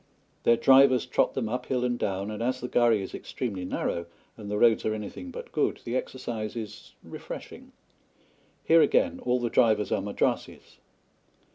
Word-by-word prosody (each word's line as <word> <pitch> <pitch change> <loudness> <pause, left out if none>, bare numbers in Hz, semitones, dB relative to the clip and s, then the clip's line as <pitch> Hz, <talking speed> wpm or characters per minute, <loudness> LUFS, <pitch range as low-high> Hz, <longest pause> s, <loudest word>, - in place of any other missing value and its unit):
Their 115 - +5
drivers 135 -1 +5
trot 125 - +1
them 125 -4 -1
uphill 125 +2 -2
and 120 -1 -1
down, 100 +1 -2
and 105 - -6
as 130 +2 -1
the 125 - -4
ghari 120 -4 +3
is 95 - -7
extremely 100 -8 -5
narrow 85 -1 -2 0.3
and 105 -2 -9
the 105 - -1
roads 115 0 +4
are 110 - 0
anything 110 - -7
but 480 - -9
good, - - 0
the - - -4
exercise 120 - -4
is 110 -3 -8
refreshing. - - -9 0.9
Here 165 0 +5
again 265 +7 +2
all 125 0 +1
the 120 -1 -2
drivers 110 -2 +3
are - - +1
Madrassis. - - -3
120 Hz, 165 wpm, -27 LUFS, 105-130 Hz, 0.9 s, Their